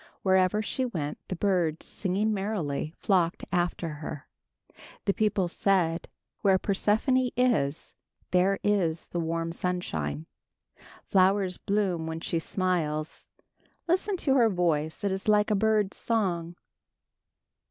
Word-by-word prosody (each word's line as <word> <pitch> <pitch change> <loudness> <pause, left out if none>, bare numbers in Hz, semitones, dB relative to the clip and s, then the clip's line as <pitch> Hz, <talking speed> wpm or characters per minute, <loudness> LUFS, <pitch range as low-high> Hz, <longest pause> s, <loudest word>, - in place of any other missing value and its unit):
Wherever 190 +2 +3
she 260 - -2
went 160 - -3
the 185 - -3
birds, 175 -4 0
singing 205 +3 -1
merrily, 180 -7 -2
flocked 180 -5 +1
after 175 -1 0
her. 150 -1 -7 0.8
The 200 - +2
people 210 -4 +1
said, 175 -2 +1 0.3
"Where 195 -2 +4
Persephone 220 +7 +1
is, 210 - +1 0.4
there 185 +2 +3
is 180 -6 0
the 175 - -3
warm 165 0 -2
sunshine. 80 - -3 0.8
"Flowers 190 -1 +3
bloom 190 -5 0
when 160 0 -4
she 165 0 -1
smiles. 165 -4 -2 0.6
"Listen 375 +3 +1
to 280 -6 +1
her 235 -3 +5
voice; 165 -4 0
it 200 - +1
is 190 +1 -4
like 210 0 +4
a - - +4
bird's 210 -1 +1
song." 175 -7 -1
185 Hz, 120 wpm, -28 LUFS, 165-210 Hz, 0.8 s, her